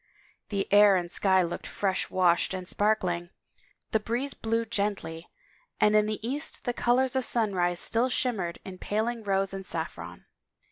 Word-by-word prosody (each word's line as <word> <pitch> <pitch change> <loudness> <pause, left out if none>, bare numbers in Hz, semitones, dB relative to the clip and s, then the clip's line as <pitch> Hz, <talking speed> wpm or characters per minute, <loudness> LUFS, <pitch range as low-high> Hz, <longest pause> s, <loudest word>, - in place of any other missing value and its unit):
The 200 -2 -1
air 205 -1 +7
and 175 -1 -2
sky 190 -1 +3
looked 170 0 -5
fresh 190 -2 -1
washed 180 0 +2
and 185 -1 -6
sparkling, 180 -5 0 0.6
the 220 - +2
breeze 240 +6 -2
blew 225 +1 -1
gently, 200 -7 -3 0.5
and 210 0 +4
in 210 0 +4
the 215 +1 -3
east 290 +5 -1
the 245 - -1
colors 250 +2 +1
of 260 - +1
sunrise 185 -7 +1
still 230 +6 +1
shimmered 215 -10 -1
in 185 -1 -9
paling 225 +3 -2
rose 195 -2 0
and 195 0 -5
saffron. 155 - -6
205 Hz, 155 wpm, -28 LUFS, 180-225 Hz, 0.6 s, air